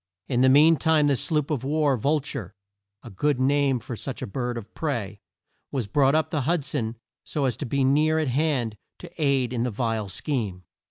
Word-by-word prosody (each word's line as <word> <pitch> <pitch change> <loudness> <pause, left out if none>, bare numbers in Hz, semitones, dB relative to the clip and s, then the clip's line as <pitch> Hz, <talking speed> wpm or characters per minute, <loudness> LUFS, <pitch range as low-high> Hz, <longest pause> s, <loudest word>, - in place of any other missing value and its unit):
In 125 -2 +1
the 130 - +6
mean 155 +4 +6
time 160 0 +3
the 145 -1 +3
sloop 150 +3 -1
of 135 -5 -1
war 145 0 +2
Vul 145 +6 +1
ture 135 - -6 0.5
a 120 - -10
good 140 +7 0
name 140 0 +2
for 120 +1 -7
such 130 +4 -6
a - - -1
bird 120 +2 -3
of 115 -1 -9
prey 115 -10 -3 0.5
was 130 -5 -1
brought 135 +6 +3
up 155 - +1
the 150 -4 0
Hud 160 +1 0
son 115 -7 -2 0.3
so 145 -3 -2
as 125 - 0
to 145 - -4
be 140 +3 0
near 150 +4 +3
at 155 -2 0
hand 130 -5 0 0.2
to - - -11
aid 135 -4 +2
in 120 - -1
the 125 - 0
vile 115 -2 -2
scheme. 100 - -3
135 Hz, 210 wpm, -25 LUFS, 120-150 Hz, 0.5 s, the